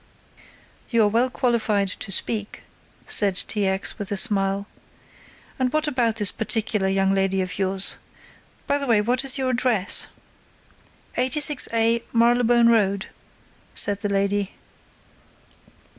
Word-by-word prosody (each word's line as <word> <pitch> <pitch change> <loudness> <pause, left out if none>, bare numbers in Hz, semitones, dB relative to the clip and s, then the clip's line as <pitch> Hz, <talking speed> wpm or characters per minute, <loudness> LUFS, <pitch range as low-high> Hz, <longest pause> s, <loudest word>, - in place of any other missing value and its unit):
"You 230 -3 +2
are - - +4
well 235 +5 +1
qualified 225 -5 0
to 195 - -4
speak," 210 +2 -2 0.4
said 200 -3 +2
T. 205 +1 +1
X. 190 +3 -2
with 205 -1 -5
a 205 - -1
smile. 195 -2 0 0.9
"And 255 -1 0
what 310 +1 +1
about 240 -6 0
this 210 -4 0
particular 215 -3 -1
young 195 0 +1
lady 195 0 0
of 185 0 -4
yours! 190 0 0 0.7
By 285 - 0
the 280 - -4
way 230 -3 +3
what 245 +5 +1
is 270 -1 +2
your 260 -1 -1
address?" 235 -6 +1 1.1
"86a 250 -4 +2
Marylebone 235 0 +3
Road," 200 -4 +1 0.7
said 200 -1 +2
the 205 - -2
lady. 200 0 -1
215 Hz, 130 wpm, -23 LUFS, 195-240 Hz, 1.1 s, are